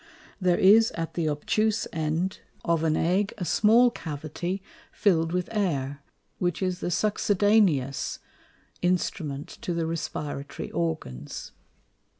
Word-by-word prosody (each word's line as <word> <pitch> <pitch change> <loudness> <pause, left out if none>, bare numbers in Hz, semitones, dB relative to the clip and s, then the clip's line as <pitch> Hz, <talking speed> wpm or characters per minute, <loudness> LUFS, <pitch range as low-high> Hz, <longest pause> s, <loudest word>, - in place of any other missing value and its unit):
There 180 -1 +3
is 220 +4 +6
at 165 -1 -4
the 165 -3 0
obtuse 215 +9 0
end 160 +4 -1 0.3
of 170 -2 +2
an 155 -1 +2
Egg 190 +4 +1
a 180 - -3
small 230 +7 +5
Cavity 160 +5 -4 0.3
fill'd 165 -5 +2
with 180 0 -1
Air, 145 -10 -1 0.4
which 180 +1 0
is 185 -1 -1
the - - -2
succedaneous 205 -7 +2 0.6
Instrument 165 -5 -1
to 175 - -2
the 165 -1 0
Respiratory 150 -3 -4
Organs. 160 - -4
175 Hz, 120 wpm, -27 LUFS, 155-195 Hz, 0.6 s, is